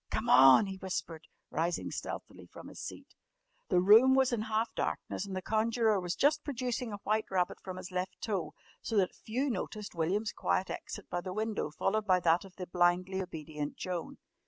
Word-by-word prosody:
"Come - - -2
on!" 130 - +8
he 195 -1 -6
whispered, 170 -4 -5 0.2
rising 170 +2 -1
stealthily - - -7
from - - -11
his - - -10
seat. - - -8 0.6
The 180 -4 +4
room 225 +8 +7
was 265 -2 +3
in 230 - 0
half 220 +1 -1
darkness 200 - -3
and 190 - -5
the 185 - -4
conjurer 220 -1 +2
was 175 -1 -3
just 300 - +2
producing 250 -3 -3
a 205 - -4
white 215 +1 +1
rabbit 180 -2 0
from 185 -1 -7
his 185 0 -8
left 185 +1 -3
toe, 200 -6 -3 0.3
so 225 - -2
that 190 -2 +2
few 250 +6 -2
noticed 210 0 -5
William's 185 +6 0
quiet 190 - -1
exit 205 - -7
by 175 - -1
the 185 0 -5
window 215 -5 -2
followed 215 +7 -1
by 185 -1 +5
that 170 +2 +3
of 190 -2 -14
the 185 - -5
blindly 180 +2 +1
obedient 155 -4 -5
Joan. 180 -2 -4
190 Hz, 190 wpm, -32 LUFS, 175-220 Hz, 0.6 s, on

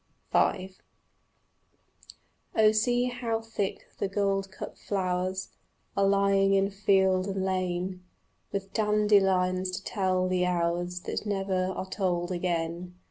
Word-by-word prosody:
V 190 -1 +2 1.8
Oh 215 -1 +6
see 245 +3 +2
how 245 -2 -2
thick 225 -3 -4
the 195 - -1
goldcup 195 -1 -2
flowers 185 -1 -2 0.5
Are 195 0 +3
lying 195 0 +3
in 195 +1 +2
field 190 -1 +2
and 195 -1 -2
lane, 185 0 -2 0.5
With 195 -1 -4
dandelions 195 -4 +3
to 195 - -8
tell 185 -2 0
the 185 0 +1
hours 175 0 -1
That 210 - -4
never 195 -2 0
are 190 0 -4
told 180 -3 -1
again. 175 0 -2
190 Hz, 115 wpm, -28 LUFS, 185-200 Hz, 1.8 s, Oh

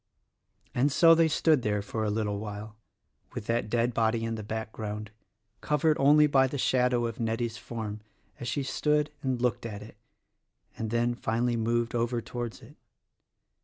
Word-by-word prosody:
And 135 +4 +2
so 165 +4 +7
they 165 0 +4
stood 155 -2 +3
there 105 -2 -1
for 110 +2 -3
a 105 - 0
little 105 -1 -1
while 105 0 -7 0.6
with - - -5
that 115 -1 -1
dead 120 +2 +1
body 115 0 +1
in 115 0 -2
the 110 - -4
background, 110 -1 -5 0.5
covered 150 +1 +2
only 150 +2 +6
by 135 -2 +4
the 140 - -4
shadow 125 -2 +2
of 115 -1 -4
Nettie's 115 0 -1
form 110 -3 -6 0.4
as 120 - -5
she 140 +3 -1
stood 150 +3 +1
and 130 -2 -1
looked 125 -1 0
at 105 -2 -6
it 105 - -13 0.8
and 110 - -4
then 120 +1 +1
finally 120 +1 0
moved 115 +1 0
over 120 0 0
towards 120 0 -6
it. - - -15
115 Hz, 165 wpm, -28 LUFS, 110-130 Hz, 0.8 s, so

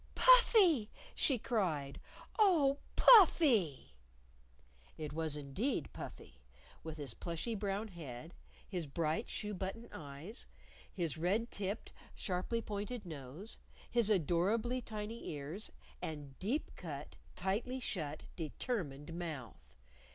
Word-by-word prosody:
"Puffy!" 405 - +7 0.2
she 270 - +2
cried. 170 - -1 0.4
"Oh, 305 -9 +5 0.2
Puffy!" 275 - +6 1.0
It 150 -2 -5
was 160 -2 +1
indeed 150 - -2
Puffy, - - -9 0.4
with 160 0 -6
his 140 -6 -3
plushy 170 - -3
brown 205 +1 -2
head, 160 -2 -8 0.3
his 175 -6 -3
bright, 160 - -1
shoe 210 -1 -3
button 195 +5 -4
eyes, 150 - -6 0.4
his 165 -5 -2
red 205 +8 +1
tipped, 200 +2 -3 0.2
sharply 195 +5 -2
pointed 210 +2 -4
nose, 155 - -7 0.3
his 235 -3 +3
adorably 210 - +2
tiny 220 0 -5
ears, 150 +8 -5 0.3
and 145 -3 -6
deep 245 +11 -1
cut, 150 -5 -7 0.2
tightly 205 +8 -1
shut, 155 - -3
determined 160 - -3
mouth. 160 -8 -6
185 Hz, 105 wpm, -36 LUFS, 155-230 Hz, 1.0 s, Puffy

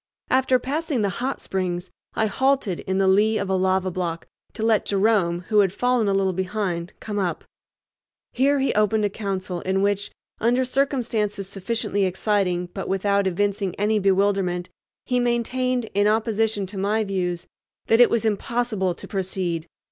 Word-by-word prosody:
After 260 0 +4
passing 280 -1 -2
the 200 - +1
"Hot 265 +2 -2
Springs" 180 -2 -3 0.2
I 220 - +2
halted 265 -4 +1
in 190 0 -2
the 195 0 +3
lee 210 +3 +4
of 200 -2 -2
a - - +2
lava 185 0 +1
block 170 -2 -3 0.3
to 220 - -4
let 220 -2 +3
Jerome, 195 -4 +2
who 215 -2 +4
had 195 -3 +4
fallen 245 +1 +1
a 200 - +2
little 190 -1 +1
behind, 185 -2 -2
come 210 -2 -4
up. 180 -3 -2 0.9
Here 275 +3 +3
he 270 0 +1
opened 215 0 +2
a 205 - -1
council 190 -4 -4
in 190 +1 0
which, 205 0 0 0.3
under 245 +3 +2
circumstances 235 -7 -1
sufficiently 200 0 -1
exciting 185 -2 0
but 195 - -5
without 200 +1 +1
evincing 200 0 -1
any 210 +1 +2
bewilderment, 195 -2 +1 0.4
he 250 -1 +1
maintained, 245 0 0
in 205 +1 +3
opposition 220 -1 +1
to 190 +1 -7
my 210 +3 +1
views, 180 -3 -2 0.4
that 225 +2 +4
it 245 - +7
was 230 -1 0
impossible 215 -3 0
to - - -11
proceed. 185 -4 -2
205 Hz, 165 wpm, -23 LUFS, 190-225 Hz, 0.9 s, it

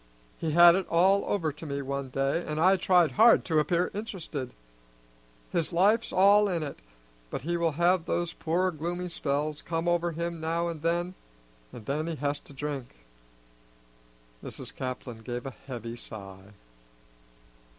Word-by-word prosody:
He 165 - -2
had 170 +1 +9
it 190 0 -1
all 190 +4 +4
over 165 -6 0
to 150 - -13
me 140 0 -3
one 140 0 -4
day, 135 +6 0
an' 155 -2 -4
I 185 +4 +5
tried 180 -4 +3
hard 230 - +5
to 160 -3 +2
appear 170 +3 +1
interested. 175 - -5 1.0
His 170 -3 0
life's 205 +7 +3
all 200 +2 +5
in 170 -4 -1
it, 145 - -6 0.5
but - - -4
he 170 +3 -1
will 170 -2 +1
have 175 +2 +2
those 175 -1 -1
poor 180 +3 0
gloomy 175 +3 -4
spells 150 -1 -2
come 165 0 -3
over 175 0 +1
him 170 0 -4
now 165 +2 -1
an' 165 -2 -5
then, 170 +3 -1 0.6
an' 115 - -10
then 150 +7 -2
he 165 - -2
has 145 -1 -2
to - - -16
drink." 135 - -6 1.4
Mrs. - - -6
Caplin 130 -2 -5
gave 120 +2 -5
a 135 - -4
heavy 120 -1 -8
sigh. 100 -3 -10
165 Hz, 160 wpm, -28 LUFS, 140-175 Hz, 1.4 s, had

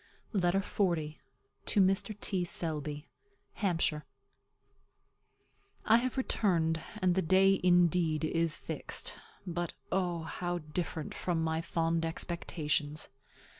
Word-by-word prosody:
LETTER 195 0 +2
XL. 190 -3 +1 0.7
TO - - +2
MR. 195 +2 +2
T. 190 -3 0
SELBY. 150 -3 -2 0.5
HAMPSHIRE. 165 -6 0 1.8
I 225 - +7
have 255 +2 -1
returned; 165 -10 +1 0.2
and 185 -3 +3
the 190 - +2
day, 190 +2 +4
indeed, 175 -3 +4
is 165 0 +1
fixed; - - -2 0.3
but 175 -1 -3 0.2
O, 175 -3 0
how 175 +2 -3
different 160 0 -4
from 170 -3 -1
my 160 0 0
fond 165 0 0
expectations! 155 -3 -1
175 Hz, 105 wpm, -32 LUFS, 160-185 Hz, 1.8 s, I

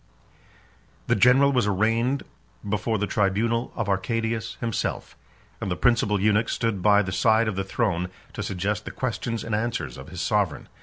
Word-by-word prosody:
The - - +2
general 135 +3 +5
was 125 -6 +2
arraigned 115 +7 +1 0.4
before 110 +2 0
the 105 - 0
tribunal 110 +5 0
of 115 -3 -2
Arcadius 110 +3 -1
himself; 115 -2 -3 0.5
and - - -2
the 90 - 0
principal 110 -3 +2
eunuch 105 +3 +2
stood 115 -5 -1
by 105 +1 +5
the 95 - -4
side 110 +4 +3
of 110 - -1
the 95 - -1
throne 95 -3 -1 0.2
to - - -5
suggest 100 +3 -2
the - - -4
questions 115 -2 -3
and 115 - -4
answers 110 - -2
of 65 - -10
his 90 - -8
sovereign. 100 -5 0
105 Hz, 165 wpm, -25 LUFS, 95-115 Hz, 0.5 s, general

